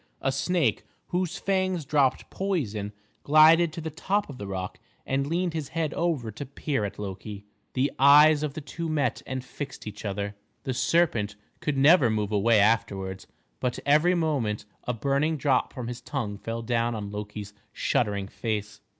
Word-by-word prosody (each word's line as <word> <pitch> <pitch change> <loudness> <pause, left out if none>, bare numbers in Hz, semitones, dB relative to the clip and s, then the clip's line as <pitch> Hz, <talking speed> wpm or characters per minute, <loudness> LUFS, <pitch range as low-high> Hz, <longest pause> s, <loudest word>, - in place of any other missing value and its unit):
A 135 - +1
snake, 140 - +1 0.3
whose 180 +1 -1
fangs 185 -5 0
dropped 135 -2 +1
poison, 120 - -2 0.3
glided 155 +3 +6
to 165 - -5
the 160 0 -4
top 200 +6 -1
of 130 - -11
the 100 - -5
rock 95 -1 -5 0.3
and 135 +1 0
leaned 170 +2 0
his 155 -4 -3
head 155 +1 -2
over 155 -10 -1
to 125 - -6
peer 140 -3 -2
at 100 - -6
Loki. 100 +1 -7 0.3
The 135 +2 +2
eyes 145 +2 +7
of 150 -2 -3
the 155 - -4
two 160 +4 -5
met 145 -6 0
and 130 -1 -4
fixed 140 +2 -7
each 105 -1 -7
other. 100 0 -3 0.3
The 130 - -2
serpent 120 -6 +1 0.2
could 150 -2 -1
never 140 -2 +6
move 105 -1 -1
away 105 +2 +4
afterwards; 100 -3 +1 0.3
but 125 -1 -1
every 155 +6 +4
moment 140 -12 0 0.2
a 125 - -1
burning 140 +6 +1
drop 135 -3 +1
from 125 -2 -6
his 120 0 -6
tongue 120 -6 -3
fell 115 +1 -4
down 115 0 0
on 100 -2 -5
Loki's 105 -1 -6 0.2
shuddering 100 -2 0
face. 105 -1 -4
130 Hz, 170 wpm, -27 LUFS, 105-155 Hz, 0.3 s, eyes